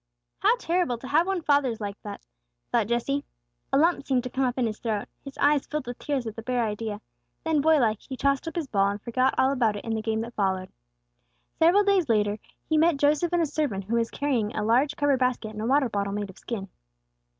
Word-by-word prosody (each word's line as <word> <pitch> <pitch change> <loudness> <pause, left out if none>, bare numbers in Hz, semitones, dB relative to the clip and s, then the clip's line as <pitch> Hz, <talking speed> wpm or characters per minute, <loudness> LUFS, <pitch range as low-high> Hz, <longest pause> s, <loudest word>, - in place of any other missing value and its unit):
"How 430 +4 +4
terrible 345 - 0
to 260 - -9
have 320 +6 +3
one's 380 -4 -2
father 285 -5 +3
like 205 -1 -5
that," 205 -1 -8 0.5
thought 230 -4 +2
Jesse. 260 +5 0 0.5
A 270 - +3
lump 330 +1 +3
seemed 260 -3 0
to 250 - -6
come 270 - 0
up 250 0 -1
in 250 - +2
his 215 -1 -3
throat; 215 -3 -2 0.2
his 275 -1 -10
eyes 290 -1 +3
filled 300 -3 -3
with 245 +1 -7
tears 275 -4 -2
at 220 -1 -5
the 225 - -6
bare 245 0 0
idea. 210 -1 -4 0.4
Then, 315 -2 +2
boy 315 +1 +5
like, 220 -6 +2
he 260 - -8
tossed 275 +2 +1
up 325 - -5
his 335 -3 -1
ball, 200 -6 +2
and 200 +1 -3
forgot 255 +3 +1
all 265 - +4
about 235 -6 +1
it 205 - -7
in 225 - -2
the 220 - -1
game 220 0 -1
that 235 +1 -6
followed. 190 -3 -1 0.9
Several 350 +6 +5
days 390 -7 +2
after 210 -1 +2 0.3
he 315 -1 +2
met 330 -1 +4
Joseph 295 +4 +2
and 350 -1 +2
a - - +2
servant 285 -10 -2
who 220 +5 -2
was 230 0 0
carrying 250 -7 -1
a 210 - -1
large, 255 +7 +2
covered 285 -3 +2
basket 250 -3 0
and 215 0 -7
a 220 - -2
water 270 +1 +3
bottle 200 -3 -2
made 205 -1 -3
of - - -18
skin. 200 -5 -5
250 Hz, 240 wpm, -26 LUFS, 220-290 Hz, 0.9 s, boy